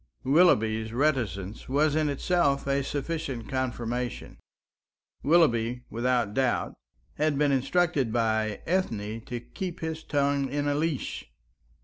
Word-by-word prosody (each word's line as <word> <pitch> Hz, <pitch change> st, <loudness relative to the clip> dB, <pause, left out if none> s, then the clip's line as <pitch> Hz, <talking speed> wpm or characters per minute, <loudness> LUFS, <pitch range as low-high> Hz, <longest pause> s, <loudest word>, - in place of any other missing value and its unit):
Willoughby's 110 Hz, -8 st, +3 dB
reticence 115 Hz, -8 st, -1 dB
was 150 Hz, +2 st, +2 dB
in 155 Hz, -1 st, +2 dB
itself 140 Hz, -1 st, +1 dB
a 140 Hz, 0 st, +1 dB
sufficient 140 Hz, -4 st, -3 dB
confirmation. 125 Hz, -1 st, -3 dB, 0.8 s
Willoughby, 125 Hz, -7 st, +3 dB
without 120 Hz, -2 st, 0 dB
doubt, 130 Hz, 0 st, 0 dB, 0.4 s
had 150 Hz, -1 st, +1 dB
been 145 Hz, 0 st, +3 dB
instructed 135 Hz, -1 st, +1 dB
by 110 Hz, -2 st, 0 dB
Ethne 115 Hz, -, -1 dB
to 120 Hz, -, -4 dB
keep 180 Hz, -, -6 dB
his 160 Hz, 0 st, -3 dB
tongue 140 Hz, -2 st, +1 dB
in 145 Hz, +2 st, -1 dB
a 145 Hz, -, +2 dB
leash. 150 Hz, -, -2 dB
135 Hz, 115 wpm, -27 LUFS, 115-150 Hz, 0.8 s, Willoughby's